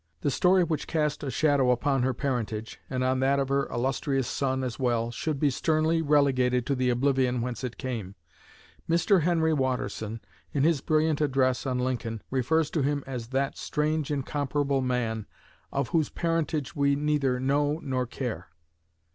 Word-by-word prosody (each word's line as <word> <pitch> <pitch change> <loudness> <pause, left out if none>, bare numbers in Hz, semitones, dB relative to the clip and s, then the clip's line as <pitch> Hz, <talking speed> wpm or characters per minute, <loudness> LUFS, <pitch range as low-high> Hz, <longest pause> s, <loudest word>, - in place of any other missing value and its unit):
The 145 - +1
story 185 +5 +4
which 160 -3 -2
cast 150 -3 -1
a 140 - -2
shadow 140 -1 +2
upon 135 +2 +2
her 130 +1 +2
parentage, 115 -5 -3
and 130 -1 -1
on 130 0 +1
that 135 +1 +3
of 135 -1 0
her 140 0 +1
illustrious 135 +1 -1
son 130 -1 -1
as 125 0 -4
well, 120 -2 0
should 145 +4 -3
be 145 -1 +3
sternly 160 +4 +1
relegated 130 -5 +2
to 140 - 0
the 130 -1 +1
oblivion 125 0 +2
whence 125 +2 -4
it 125 -2 -4
came. 110 -7 -5 0.7
Mr. 170 +3 +3
Henry 160 -1 +2
Watterson, 115 -5 -2 0.3
in 140 - +1
his 160 -3 +3
brilliant 155 0 +1
address 130 -2 +1
on 130 -1 0
Lincoln, 120 -3 -2
refers 145 +4 +1
to 160 - 0
him 140 0 0
as 125 -4 -5
"that 135 +2 -1
strange, 150 0 -1
incomparable 140 -1 -1
man, 120 -4 -1 0.4
of 140 -3 -1
whose 160 -4 +1
parentage 165 -3 -1
we 140 -1 +3
neither 145 -3 +1
know 145 +3 +1
nor 130 -3 -1
care." 125 - -5
135 Hz, 165 wpm, -27 LUFS, 125-150 Hz, 0.7 s, story